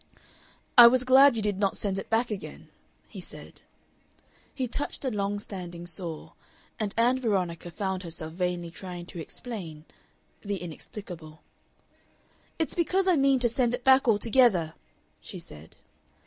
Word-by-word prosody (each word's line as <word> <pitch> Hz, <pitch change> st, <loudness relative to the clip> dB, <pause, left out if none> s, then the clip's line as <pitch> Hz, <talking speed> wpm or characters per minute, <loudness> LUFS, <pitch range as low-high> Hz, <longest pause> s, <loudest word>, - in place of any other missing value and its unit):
"I 240 Hz, -, +13 dB
was 255 Hz, +1 st, +4 dB
glad 265 Hz, +1 st, +6 dB
you 220 Hz, -, -2 dB
did 205 Hz, -2 st, -1 dB
not 200 Hz, -2 st, +1 dB
send 195 Hz, -2 st, -1 dB
it -, -, -8 dB
back 230 Hz, +1 st, +1 dB
again," 205 Hz, -, -7 dB, 0.4 s
he -, -, -9 dB
said. -, -, -10 dB, 0.9 s
He 260 Hz, -3 st, -3 dB
touched 285 Hz, +3 st, -4 dB
a 260 Hz, -, 0 dB
long 205 Hz, -1 st, -1 dB
standing 175 Hz, -4 st, -8 dB
sore, 170 Hz, -2 st, -2 dB, 0.5 s
and 210 Hz, -2 st, -1 dB
Ann 245 Hz, +3 st, +3 dB
Veronica 185 Hz, -8 st, -1 dB
found 190 Hz, +1 st, -3 dB
herself 160 Hz, -2 st, -6 dB
vainly 175 Hz, -1 st, -2 dB
trying 175 Hz, 0 st, -8 dB
to 175 Hz, -, -9 dB
explain 165 Hz, -5 st, -7 dB, 0.6 s
the 200 Hz, -1 st, -3 dB
inexplicable. 165 Hz, -2 st, -9 dB, 1.1 s
"It's 320 Hz, -, -1 dB
because 370 Hz, +3 st, +1 dB
I 365 Hz, -, +5 dB
mean 275 Hz, -2 st, +4 dB
to 240 Hz, -, +4 dB
send 245 Hz, 0 st, +1 dB
it 245 Hz, -, -11 dB
back 265 Hz, 0 st, +5 dB
altogether," 210 Hz, -6 st, +3 dB, 0.5 s
she -, -, -9 dB
said. 75 Hz, +1 st, -12 dB
205 Hz, 150 wpm, -27 LUFS, 175-245 Hz, 1.1 s, I